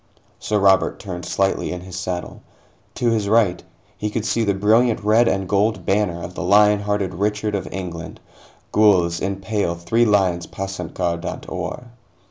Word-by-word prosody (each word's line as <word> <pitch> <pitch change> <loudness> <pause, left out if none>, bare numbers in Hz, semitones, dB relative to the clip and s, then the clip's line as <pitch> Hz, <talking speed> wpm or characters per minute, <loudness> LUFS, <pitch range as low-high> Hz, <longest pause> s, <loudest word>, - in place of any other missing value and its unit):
Sir 105 - -1
Robert 95 -1 +3
turned 90 -3 -6
slightly 95 0 0
in 90 0 -5
his 95 0 -9
saddle. 90 -1 -5 0.5
To 120 -1 +1
his 105 -3 0
right, 105 -6 +3 0.3
he 105 - -3
could 110 0 -3
see 115 - +1
the 100 -2 +1
brilliant 110 +3 +3
red 110 +3 +4
and 95 -1 0
gold 105 +3 +1
banner 95 -4 0
of 90 - -7
the - - -6
lion 105 +2 +5
hearted 100 -2 -2
Richard 105 +3 -1
of 95 -2 -3
England 90 -3 -6 0.5
gules, 90 -5 +3
in 100 0 -2
pale 100 -4 -1
three 115 +8 +1
lions 95 -5 +2
passant 95 -3 -6
guardant 85 -2 -3
or. - - -5
100 Hz, 165 wpm, -21 LUFS, 90-105 Hz, 0.5 s, lion